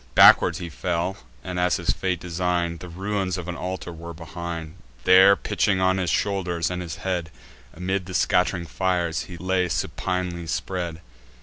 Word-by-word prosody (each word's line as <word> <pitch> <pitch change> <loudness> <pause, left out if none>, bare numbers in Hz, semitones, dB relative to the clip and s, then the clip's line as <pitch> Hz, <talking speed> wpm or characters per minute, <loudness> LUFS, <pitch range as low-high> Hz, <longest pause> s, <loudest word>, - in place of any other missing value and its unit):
Backward - - +7
he 90 - -5
fell; 85 +3 -2 0.3
and, 90 -1 -4
as 90 0 +3
his - - 0
fate 90 -3 -1
design'd, 85 -1 -1
The 90 - -9
ruins 95 +1 -2
of 90 0 -6
an 90 - -3
altar 90 0 -5
were 85 0 -8
behind: 85 -1 -6 0.3
There, 95 +2 +8
pitching 100 -2 0
on 95 0 +3
his 90 -2 0
shoulders 90 -3 0
and 90 0 -3
his 85 -3 -5
head, 90 -3 -2 0.5
Amid 95 +2 -2
the 95 - -7
scatt'ring 90 -1 +2
fires 85 -2 -1
he 90 - -9
lay 90 +1 0
supinely 90 0 -2
spread. 85 0 -3
90 Hz, 165 wpm, -24 LUFS, 85-95 Hz, 0.5 s, There